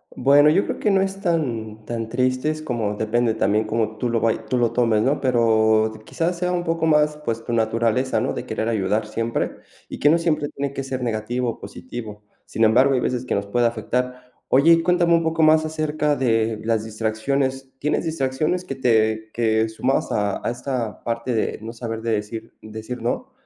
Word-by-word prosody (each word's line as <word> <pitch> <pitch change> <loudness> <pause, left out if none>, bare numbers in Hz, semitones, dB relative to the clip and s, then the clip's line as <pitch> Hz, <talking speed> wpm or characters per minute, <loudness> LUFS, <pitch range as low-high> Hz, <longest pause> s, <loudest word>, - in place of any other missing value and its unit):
Bueno, 140 +3 +5
yo 185 +6 +3
creo - - -4
que 215 - +1
no 195 -1 +3
es 195 0 -3
tan 115 - -2
tan 115 -1 -4
tristes, 130 +6 0
como 115 -7 -2
depende 110 +1 0
también 105 0 +1
como 110 0 -1
tú 120 - -1
lo 115 -1 +1
vay 115 0 +1
tú 130 - +1
lo 120 -2 +2
tomes, 115 -3 +2
¿no? 140 +4 +1
Pero, 110 -3 +3
quizá, 165 +9 -1
sea 180 +1 -2
un 175 -1 -1
poco 165 -1 0
más, 150 -1 +3
pues, 115 -6 -4
tu 120 - -3
naturaleza, 115 +3 +1
¿no?, - - -1
de - - -6
querer 110 - -2
ayudar 105 0 0
siempre, 115 +2 -2 0.3
y - - -8
que 145 - +4
no 165 - +5
siempre 155 -3 0
tiene 140 0 -4
que 135 - -4
ser 130 -1 -4
negativo 120 +2 -1
o 115 - -6
positivo. 110 -5 -8 0.2
Sin 115 - -1
embargo, 130 +5 +5
hay - - +2
veces 125 0 -1
que 125 - -2
nos 100 - -1
puede 120 +4 +2
afectar. 125 +2 -3 0.2
Oye, 140 +6 +5
y 165 - +3
cuéntame 175 0 +3
un 165 - +4
poco 160 0 +1
más 155 0 +5
acerca 155 -1 -1
de 115 -4 +1
las 110 -1 +1
distracciones. 130 +5 -2
¿Tienes 150 +3 -1
distracciones 155 +3 -1
que 160 - -4
te 110 -4 +1
que 110 -1 +1
sumabas 125 +4 -1
a 105 -2 -1
a - - 0
esta 120 -2 -4
parte 115 +1 -2
de 110 - -1
no 110 +1 -6
saber 115 -1 -5
de 115 0 -1
decir 110 +2 -4
decir 110 +3 -7
no? 250 - -2
120 Hz, 200 wpm, -22 LUFS, 110-145 Hz, 0.3 s, Bueno